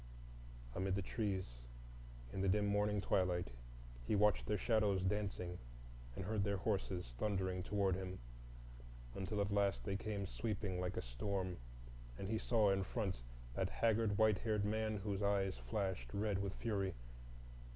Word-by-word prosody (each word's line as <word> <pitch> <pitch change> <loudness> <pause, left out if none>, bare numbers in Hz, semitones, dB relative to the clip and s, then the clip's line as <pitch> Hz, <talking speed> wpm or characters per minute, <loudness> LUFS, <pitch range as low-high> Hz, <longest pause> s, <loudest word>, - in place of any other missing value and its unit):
Amid 95 +1 0
the 100 - -1
trees 95 - -2 0.7
in 95 - -2
the 100 - +3
dim 105 +2 +3
morning 105 0 +2
twilight 90 -5 +1 0.6
he - - +3
watched 105 0 +4
their 105 - +2
shadows 105 -5 +2
dancing 95 -3 -1 0.6
and 95 - -4
heard 105 0 +1
their 100 0 +1
horses 95 - -1
thundering 95 -3 0
toward 100 0 +1
him, 95 0 -3 1.0
until 100 - -2
at 100 0 +1
last 100 -1 +2
they 100 -2 -1
came 100 -1 -2
sweeping 95 - -2
like 90 - -2
a - - -1
storm, 90 +10 -2 0.6
and 95 - -4
he 110 0 +1
saw 110 -4 +4
in 95 0 +2
front 95 - -2 0.3
that - - 0
haggard 110 -2 +2
white 110 -2 +5
haired 105 -3 +1
man, 110 0 0
whose 100 0 -2
eyes 100 -2 +2
flashed 95 - -2
red 100 -1 +1
with 100 0 -2
fury. 100 -5 -1
100 Hz, 150 wpm, -39 LUFS, 95-105 Hz, 1.0 s, white